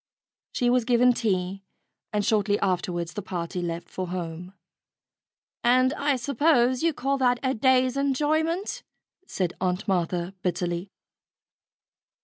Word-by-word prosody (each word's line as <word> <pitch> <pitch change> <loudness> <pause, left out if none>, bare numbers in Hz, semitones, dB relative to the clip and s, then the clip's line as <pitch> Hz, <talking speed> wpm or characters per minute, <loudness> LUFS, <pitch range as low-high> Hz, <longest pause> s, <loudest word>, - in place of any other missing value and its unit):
She 245 -1 +2
was 250 -1 +3
given 245 +1 +4
tea, 195 -4 -1 0.5
and 210 -1 0
shortly 205 -1 +2
afterwards 175 -3 -1
the 205 - -4
party 180 -1 -4
left 170 0 -4
for 185 -1 -5
home. 175 +1 -6 1.1
"And 255 +2 +4
I 285 -1 +1
suppose 255 -1 +2
you 335 0 +3
call 275 -1 -1
that 245 -1 +3
a 260 0 +1
day's 255 +1 +3
enjoyment," 310 +7 0 0.5
said 180 -3 -2
Aunt 185 +2 -1
Martha 180 -1 -1
bitterly. 175 +1 -2
215 Hz, 125 wpm, -26 LUFS, 180-260 Hz, 1.1 s, given